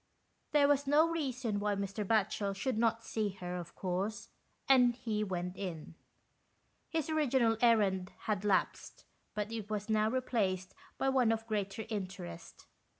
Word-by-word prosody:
There 290 Hz, -1 st, +5 dB
was 285 Hz, -1 st, +2 dB
no 300 Hz, +3 st, +5 dB
reason 260 Hz, -10 st, -2 dB
why 205 Hz, 0 st, 0 dB
Mr. 200 Hz, +1 st, -3 dB
Batchel 200 Hz, -1 st, +1 dB
should 235 Hz, +6 st, -1 dB
not 230 Hz, 0 st, +2 dB
see 215 Hz, -2 st, -1 dB
her, 180 Hz, -2 st, -5 dB
of 170 Hz, -1 st, -7 dB
course, 190 Hz, +4 st, -3 dB, 0.4 s
and 250 Hz, -3 st, +6 dB
he 220 Hz, -4 st, -2 dB
went 180 Hz, -2 st, -3 dB
in. 175 Hz, -5 st, -6 dB, 1.0 s
His 320 Hz, -3 st, -1 dB
original 265 Hz, -7 st, +2 dB
errand 200 Hz, -6 st, +3 dB
had 210 Hz, -2 st, -1 dB
lapsed, 200 Hz, -2 st, 0 dB, 0.3 s
but 210 Hz, +1 st, -2 dB
it 220 Hz, -2 st, -5 dB
was 210 Hz, 0 st, -3 dB
now 215 Hz, 0 st, +3 dB
re 255 Hz, +2 st, 0 dB
placed 190 Hz, -7 st, -1 dB, 0.2 s
by 270 Hz, -, +1 dB
one 255 Hz, -4 st, +3 dB
of 225 Hz, 0 st, -1 dB
greater 210 Hz, -1 st, -2 dB
interest. 185 Hz, -, -6 dB
215 Hz, 150 wpm, -33 LUFS, 195-245 Hz, 1.0 s, and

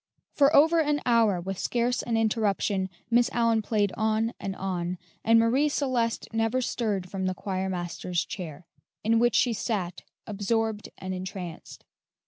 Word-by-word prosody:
For 285 Hz, +1 st, +4 dB
over 320 Hz, +4 st, +6 dB
an 295 Hz, -2 st, +2 dB
hour, 225 Hz, -6 st, +3 dB
with 190 Hz, +2 st, -5 dB
scarce 245 Hz, +1 st, 0 dB
an 230 Hz, -2 st, -1 dB
interruption, 210 Hz, -3 st, +1 dB, 0.2 s
Miss 240 Hz, +2 st, +4 dB
Allyn 230 Hz, -2 st, +2 dB
played 205 Hz, -2 st, 0 dB
on 220 Hz, +2 st, 0 dB
and 195 Hz, -1 st, -4 dB
on, 180 Hz, -2 st, -3 dB, 0.3 s
and 230 Hz, 0 st, +5 dB
Marie 255 Hz, +6 st, +3 dB
Celeste 250 Hz, -5 st, 0 dB
never 225 Hz, +3 st, +1 dB
stirred 210 Hz, -7 st, -1 dB
from 190 Hz, 0 st, -3 dB
the 185 Hz, -, -1 dB
choirmaster's 180 Hz, -2 st, -2 dB
chair, 170 Hz, -2 st, -7 dB, 0.4 s
in 225 Hz, +1 st, +3 dB
which 240 Hz, -1 st, +3 dB
she 245 Hz, -, +3 dB
sat 195 Hz, -5 st, -3 dB, 0.2 s
absorbed 215 Hz, +1 st, -1 dB
and 185 Hz, 0 st, -5 dB
entranced. 185 Hz, -2 st, -7 dB
220 Hz, 145 wpm, -27 LUFS, 190-235 Hz, 0.4 s, over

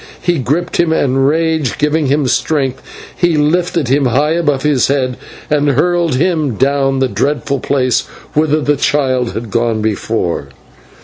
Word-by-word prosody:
He 175 Hz, -3 st, 0 dB
gripped 155 Hz, +8 st, -1 dB
him, 170 Hz, -2 st, +2 dB
and, 135 Hz, -3 st, +1 dB
rage 160 Hz, -3 st, 0 dB
giving 150 Hz, 0 st, +1 dB
him 145 Hz, +1 st, +1 dB
strength, 135 Hz, -1 st, 0 dB, 0.3 s
he 175 Hz, -3 st, +1 dB
lifted 165 Hz, 0 st, +1 dB
him 135 Hz, +2 st, +2 dB
high 140 Hz, +5 st, +1 dB
above 150 Hz, -5 st, 0 dB
his 145 Hz, -4 st, +2 dB
head 130 Hz, -2 st, 0 dB, 0.3 s
and 145 Hz, -1 st, +1 dB
hurled 170 Hz, +2 st, +1 dB
him 155 Hz, -4 st, 0 dB
down 135 Hz, +2 st, +1 dB
the 130 Hz, 0 st, +1 dB
dreadful 140 Hz, +5 st, -1 dB
place 130 Hz, -1 st, 0 dB, 0.3 s
whither 155 Hz, 0 st, +1 dB
the 145 Hz, 0 st, +1 dB
child 130 Hz, -3 st, 0 dB
had 110 Hz, -1 st, -6 dB
gone 115 Hz, -1 st, 0 dB
before. 105 Hz, -8 st, -2 dB
140 Hz, 150 wpm, -14 LUFS, 130-155 Hz, 0.3 s, him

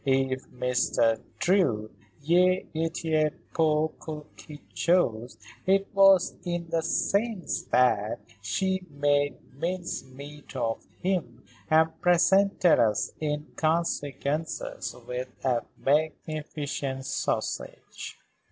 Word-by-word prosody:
If 135 Hz, -1 st, 0 dB
Mr. 125 Hz, -2 st, +1 dB, 0.2 s
Drew 120 Hz, -, +2 dB, 0.4 s
y 180 Hz, +2 st, +4 dB
était 160 Hz, -1 st, 0 dB, 0.2 s
pour 155 Hz, -1 st, +2 dB, 0.4 s
quelque 150 Hz, -1 st, -11 dB
chose, 120 Hz, -10 st, +1 dB, 0.3 s
it 195 Hz, +1 st, +4 dB
was 195 Hz, -2 st, +6 dB
in 175 Hz, -1 st, -3 dB
the 165 Hz, -1 st, +2 dB
sense 200 Hz, +4 st, 0 dB
that 110 Hz, -4 st, +2 dB, 0.2 s
she 190 Hz, -, 0 dB
made 145 Hz, 0 st, +1 dB, 0.2 s
mincemeat 150 Hz, -5 st, -5 dB
of 115 Hz, -3 st, -1 dB, 0.2 s
him 160 Hz, -11 st, -1 dB, 0.3 s
and 160 Hz, 0 st, +3 dB
presented 180 Hz, +1 st, +4 dB
us 105 Hz, -3 st, +2 dB
in 150 Hz, -1 st, -2 dB
consequence 155 Hz, -1 st, -1 dB, 0.5 s
with 125 Hz, +1 st, -3 dB, 0.2 s
a 125 Hz, -3 st, +2 dB, 0.2 s
magnificent 150 Hz, -2 st, -1 dB
sausage." -, -, -3 dB
155 Hz, 90 wpm, -27 LUFS, 130-175 Hz, 0.5 s, was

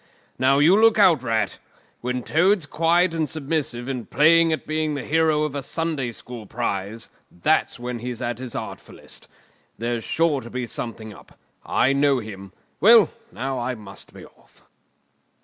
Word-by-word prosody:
Now, 135 Hz, +2 st, +4 dB
you 155 Hz, +6 st, +6 dB
look 225 Hz, +1 st, +5 dB
out, 180 Hz, -, +5 dB
Rat! 110 Hz, -6 st, -1 dB, 0.4 s
When 125 Hz, 0 st, -3 dB
Toad's 180 Hz, -, +2 dB
quiet 165 Hz, +4 st, +2 dB
and 160 Hz, -2 st, -1 dB
submissive 140 Hz, -5 st, -3 dB
and 125 Hz, -4 st, -4 dB
playing 165 Hz, +2 st, +5 dB
at 155 Hz, -, -2 dB
being 155 Hz, -1 st, -1 dB
the 140 Hz, -, -4 dB
hero 160 Hz, -1 st, +2 dB
of 150 Hz, -2 st, -2 dB
a 140 Hz, -, -3 dB
Sunday 150 Hz, -3 st, -2 dB
school 115 Hz, -1 st, -9 dB
prize, 110 Hz, -1 st, -3 dB, 0.2 s
then 120 Hz, +7 st, -1 dB
he's 120 Hz, 0 st, -5 dB
at 120 Hz, 0 st, -3 dB
his 125 Hz, -2 st, -7 dB
artfullest. -, -, -7 dB, 0.5 s
There's 115 Hz, 0 st, -2 dB
sure 160 Hz, -4 st, +1 dB
to 120 Hz, -, -10 dB
be 125 Hz, +1 st, -3 dB
something 110 Hz, -2 st, -6 dB
up. -, -, -17 dB, 0.3 s
I 135 Hz, -, +2 dB
know 140 Hz, 0 st, +3 dB
him. 100 Hz, -4 st, -8 dB, 0.3 s
Well, 225 Hz, +2 st, +7 dB, 0.2 s
now, 135 Hz, 0 st, -3 dB
I 125 Hz, +1 st, -2 dB
must 105 Hz, -3 st, -10 dB
be -, -, -12 dB
off." -, -, -23 dB
135 Hz, 160 wpm, -23 LUFS, 120-160 Hz, 0.5 s, Well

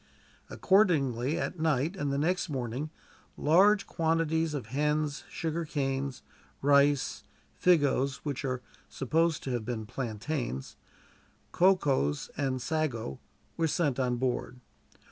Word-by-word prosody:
Accordingly, 150 Hz, -, +2 dB
at 180 Hz, -, -3 dB
night 155 Hz, +2 st, +1 dB
and 145 Hz, -6 st, -2 dB
the 140 Hz, -, 0 dB
next 180 Hz, +5 st, 0 dB
morning 130 Hz, +2 st, -3 dB, 0.5 s
large 200 Hz, +7 st, +4 dB
quantities 160 Hz, -1 st, 0 dB
of 135 Hz, -, -4 dB
hens, 150 Hz, +1 st, 0 dB
sugarcanes, 140 Hz, -5 st, -2 dB, 0.4 s
rice, 140 Hz, -1 st, +3 dB, 0.4 s
figos 140 Hz, -6 st, +3 dB
which 140 Hz, -4 st, -3 dB
are 125 Hz, -2 st, -2 dB, 0.3 s
supposed 160 Hz, +4 st, 0 dB
to 130 Hz, -, -3 dB
have 120 Hz, -2 st, -1 dB
been 110 Hz, -1 st, -4 dB
plantains 120 Hz, -, -4 dB, 0.8 s
cocoas, 145 Hz, -, +2 dB
and 135 Hz, -2 st, -1 dB
sago 130 Hz, -, -2 dB, 0.4 s
were 165 Hz, -1 st, +2 dB
sent 145 Hz, -4 st, 0 dB
on 125 Hz, -1 st, +1 dB
board. 125 Hz, 0 st, -2 dB
145 Hz, 110 wpm, -30 LUFS, 130-160 Hz, 0.8 s, large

